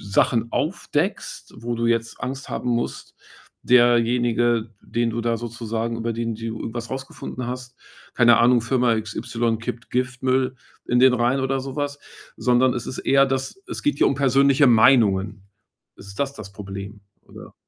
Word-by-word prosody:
Sachen 115 +3 +1
aufdeckst, 160 +3 -2
wo 120 +1 -3
du 115 0 -1
jetzt 115 -1 -1
Angst 135 +1 -5
haben 125 - -3
musst, 120 0 -3 0.5
derjenige, 120 -1 +3
den 120 0 -1
du 115 +1 -3
da 115 0 0
sozusagen 115 0 -4
über 115 0 -2
den 115 0 -3
du 115 - -9 0.2
irgendwas 120 +1 -5
rausgefunden 130 -2 -6
hast, 125 0 -6 0.4
keine 120 -3 +5
Ahnung, 120 0 +5
„Firma 125 -1 +2
XY 115 +1 -2
kippt 115 +1 -6
Giftmüll 130 +1 0 0.3
in 125 0 +2
den 130 0 +6
Rhein“ 125 +2 +1
oder 135 0 0
so 135 0 -7
was, 145 0 -3 0.4
sondern 125 +1 +3
es 120 -1 -5
ist - - -6
eher, 135 0 +4
dass 135 - -3
es - - -6
geht 295 - 0
hier - - +4
um - - +2
persönliche 140 +1 +4
Meinungen. 110 -4 +4 0.5
Ist 100 - -13
es 100 - -10
das 140 +5 -2
das 105 -7 -10
Problem, 100 +1 -8 0.2
oder? - - -13
120 Hz, 165 wpm, -23 LUFS, 115-130 Hz, 0.5 s, den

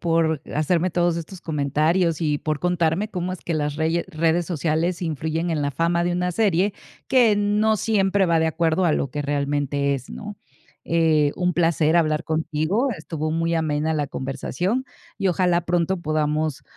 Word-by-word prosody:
por 165 -3 +1
hacerme 165 +4 +1
todos 175 -1 +1
estos 170 +2 -9
comentarios 155 +3 +1
y 150 -2 +1
por 155 -1 -2
contarme 180 +3 0
cómo 180 0 -3
es - - -12
que 170 - -3
las 150 -2 -1
reye 160 +2 0
redes 165 +2 +1
sociales 170 +2 -1
influyen 160 +1 -2
en 155 -2 0
la 145 0 0
fama 170 +4 +1
de 175 0 0
una 180 0 -1
serie 200 -1 +2 0.3
que 235 -5 +4
no 210 +1 +2
siempre 200 -2 +2
va 170 -2 +2
de 160 - +2
acuerdo 165 +2 +1
a 160 - +3
lo 140 -3 -1
que 150 - -4
realmente 140 0 0
es, 135 -2 -4
¿no? 210 -1 -8 0.5
Eh, 160 -3 +2
un 180 0 +1
placer 165 -1 +2
hablar 155 -1 +1
contigo, 160 - 0
estuvo 155 0 -4
muy 165 +1 0
amena 155 -1 0
la 150 -2 -1
conversación, 180 - -3 0.3
y 195 -2 +1
ojalá 180 -1 +2
pronto 175 +1 0
podamos 155 -1 -1
165 Hz, 170 wpm, -23 LUFS, 155-180 Hz, 0.5 s, que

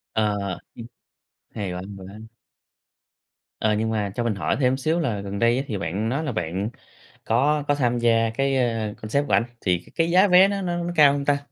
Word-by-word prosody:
Ờ. 105 -2 +1 0.4
Ừm, 115 - -8 0.6
hay 100 -4 -5
quá, 90 - -5
hay 100 0 -9
quá. 95 +3 -11 1.4
Ờ, 110 -1 +2
nhưng 110 +1 0
mà 105 -3 -1
cho 120 - -1
mình 110 -4 -1
hỏi - - -1
thêm 130 0 +2
xíu 160 +6 0
là 115 -11 -1
gần 100 0 -5
đây 115 +1 +3
á 135 - -1
thì 105 - -3
bạn 100 +6 -2
nói 140 +5 -1
là 145 - -2
bạn 95 +2 -3 0.6
có 145 +2 +2
có 145 - +2
tham 120 -3 +1
gia 115 -1 +3
cái, 135 +3 0
ơ, 115 -4 -1
concert 140 +7 -1
của - - -2
ảnh, 115 - +4 0.2
thì 90 -3 +1
c - - -44
cái 165 0 +1
giá 190 +3 +5
vé 185 +1 +7
nó 200 -1 -2
nó 175 -2 -2
nó 175 0 -3
cao 145 -2 +6
hông 140 -1 -3
ta? 145 -1 +3
115 Hz, 225 wpm, -23 LUFS, 105-145 Hz, 1.4 s, vé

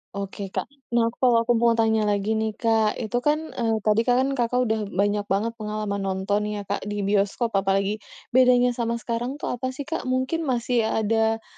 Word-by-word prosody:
Oke, 200 0 -5
Kak. - - -3 0.2
Nah 230 -1 +3
aku, - - -25
kalau 245 -3 +4
aku 240 +1 +2
mau 235 -1 +4
tanya 220 -2 +2
lagi 205 +1 0
nih, 220 -1 -2
Kak, 220 -2 +2
itu 230 +2 -2
kan, 305 +4 0
eee, 225 -1 +1
tadi 215 +1 +3
kan 250 +1 +4 0.2
Kakak 250 +1 +2
udah 220 -2 0
banyak 205 +1 0
banget 205 +4 0
pengalaman 210 -1 -3
nonton 195 +2 -1
ya, 210 -1 -4
Kak, 200 +1 -2
di 205 -1 -2
bioskop 205 +4 +1
apalagi, 195 +2 0 0.3
bedanya 250 0 +5
sama 235 -1 -2
sekarang 235 +3 -3
tuh 295 - -4
apa 250 +1 -3
sih, 285 - -5
Kak? 300 -3 -4
Mungkin 260 +5 -1
masih 235 -2 +1
ada, 225 +1 +1
225 Hz, 190 wpm, -24 LUFS, 205-245 Hz, 0.3 s, bedanya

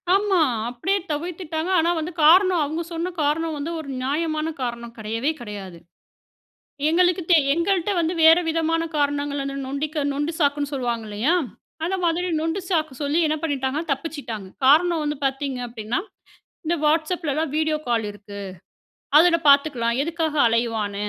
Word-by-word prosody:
ஆமா, 395 -4 +2 0.3
அப்டியே 380 +12 -1
தவிர்த்துட்டாங்க. 330 +1 -3
ஆனா 335 +2 +2
வந்து 325 +3 -4
காரணம் 360 +1 +6
அவங்க 315 +4 -3
சொன்ன 340 +3 -2
காரணம் 315 +2 0
வந்து 305 +4 -4
ஒரு 285 -3 -8
நியாயமான 310 +3 -1
காரணம் 235 -1 -5
கிடையவே 225 +7 -1
கிடையாது. 200 -5 -8 1.1
எங்களுக்கு 355 +2 +3
தெ 345 - +7 0.2
எங்கள்ட 360 +3 0
வந்து 335 +1 0
வேறு 325 +2 +7
விதமான 330 0 0
காரணங்கள் 285 0 0
வந்து 275 0 -4
நொண்டிக 295 +2 -2
நொண்டு 295 +4 -1
சாக்குனு 285 -1 +1
சொல்வாங்க 240 -4 -2
இல்லையா? 225 +12 +1 0.5
அந்த 375 +3 0
மாதிரி 345 +2 +1
நொண்டு 325 +4 -1
சாக்கு 310 -5 0
சொல்லி 290 +4 +1
என்ன 310 - +1
பண்ணிட்டாங்கனா 285 +2 -2
தப்பிச்சிட்டாங்க. 270 - -4 0.2
காரணம் 325 +3 +5
வந்து 295 0 -1
பார்த்தீங்க 270 -1 -2
அப்டினா, 225 0 -3 0.7
இந்த 340 +2 +1
வாட்ஸ்அப்‌லலாம் 310 -1 0
வீடியோ 310 0 +1
கால் 230 -3 +1
இருக்கு. 205 0 -11 0.8
அதுல 335 +1 +6
பார்த்துக்கலாம். 270 -4 +3
எதுக்காக 325 -1 -2
அலைவான. 225 -3 0
305 Hz, 140 wpm, -23 LUFS, 265-330 Hz, 1.1 s, தெ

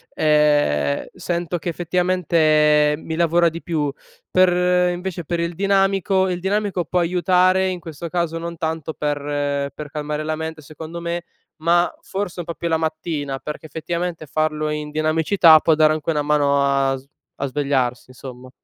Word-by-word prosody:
ehm, 145 - +2
sento 175 0 -3
che 170 - -4
effettivamente 160 -4 +2
mi 160 +1 -6
lavora 170 0 +3
di 165 +1 -8
più. 150 -4 -2 0.4
Per 180 -1 +3
invece 175 -1 -5
per 170 +2 -2
il 170 0 -2
dinamico 195 0 +2
il 180 -1 -2
dinamico 195 -2 -1
pò 180 - 0
aiutare, 185 +2 +3
in 180 -1 -3
questo 165 0 -8
caso 170 -1 -1
non 170 0 -6
tanto 160 -1 -3
per 145 -1 -2
per 150 -1 -7
calmare 150 0 -3
la 155 0 -2
mente, 160 0 -6
secondo 160 +3 -8
me; 170 0 -3 0.3
ma 175 +2 +2
forse 190 -2 -5
un 170 - -4
pò 170 - -5
più 170 - -4
la 160 -1 +2
mattina 155 -3 -3
perché, 150 +3 -7
effettivamente, 170 +2 -4
farlo 155 +1 -1
in 150 0 -4
dinamicità 155 +2 +4
può 160 - +3
dare 155 0 +4
anche 155 +1 -2
una 150 -1 0
mano 145 -1 +2
a 135 -1 +2
sv 130 +1 -16 0.3
a - - +1
svegliarsi, 130 -3 -1
insomma. 130 0 -10
160 Hz, 165 wpm, -21 LUFS, 150-175 Hz, 0.4 s, dinamicità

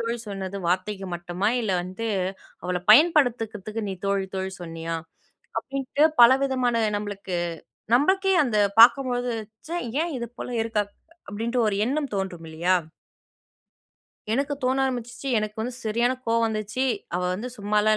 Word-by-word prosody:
தோழி 230 +1 -1
சொன்னது 195 -1 -5
வார்த்தைக்கு 190 +2 -1
மட்டுமா? 175 +4 -1
இல்ல 215 -4 -1
வந்து 185 +6 -5 0.6
அவள 180 0 -1
பயன்படுத்துக்கறதுக்கு 225 - +3
நீ 190 - -3
தோழி, 195 -1 +1
தோழி 190 0 -3
சொன்னியா?" 165 0 -4 0.6
அப்படின்ட்டு 275 +2 0 0.2
பலவிதமான 260 -1 +4 0.2
நம்பளுக்கு 200 -3 -5 0.6
நம்பளுக்கே 380 +8 +3
அந்த 225 -4 -1 0.2
பார்க்கும்போது, 245 0 +5 0.4
"ச்ச! - - -11 0.3
ஏன் 340 -1 -3
இது 235 - -4
போல - - -5
இருக்கா?" 225 -2 0 0.5
அப்படின்ட்டு 230 +4 -1
ஒரு 200 - 0
எண்ணம் 280 0 -1
தோன்றும் 190 -4 -3
இல்லையா? 170 +4 +1 1.6
"எனக்கு 280 +3 0
தோண 255 +1 +2
ஆரம்பிச்சுச்சி. 245 +1 -4
எனக்கு 215 0 -3
வந்து 245 +2 -3
சரியான 235 +3 +2
கோவம் 230 0 +2
வந்துச்சி. 215 +4 -2 0.3
அவ 180 - -1
வந்து 230 +6 -4
சும்மாலாம் 210 +1 +2
225 Hz, 130 wpm, -25 LUFS, 195-250 Hz, 1.6 s, பார்க்கும்போது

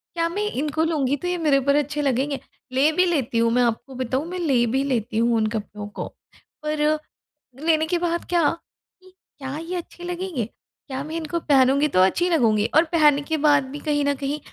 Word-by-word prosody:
क्या 335 0 +1
मैं 410 +4 -2
इनको 300 +3 -1
लूँगी, 285 -4 +1
तो 355 - -5
ये 355 0 0
मेरे 295 -4 +3
पर 280 +2 +2
अच्छे 295 0 0
लगेंगे? 275 +1 0 0.3
ले 275 +4 +3
भी 365 +3 +3
लेती 275 -9 0
हूँ। 230 0 +3
मैं 250 0 +3
आपको 240 +3 -2
बताऊँ, 260 +4 -2
मैं 365 0 -4
ले 265 -8 +2
भी 265 +4 0
लेती 235 -4 -1
हूँ 235 0 +3
उन 215 -1 +1
कपड़ों 205 -1 -5
को 210 - -6 0.6
पर 305 0 +1 0.7
लेने 315 -1 +3
के 350 - +1
बाद 340 -1 -1
क्या 345 -1 +3 0.6
इ 370 - -18 0.3
क्या 270 +2 -5
ये 335 +3 -5
अच्छे 350 0 -7
लगेंगे? 350 - -3 0.4
क्या 265 0 -4
मैं 315 +2 -6
इनको 330 +1 -3
पहनूँगी, 280 0 +3
तो 185 - +1
अच्छी 350 - +2
लगूँगी? 220 -10 +3
और 320 - +7
पहनने 295 -2 +5
के 315 +2 -2
बाद 290 -2 +4
भी 290 - -6
कहीं 290 -2 0
न 285 0 +1
कहीं 280 +2 -3
290 Hz, 205 wpm, -23 LUFS, 260-325 Hz, 0.7 s, और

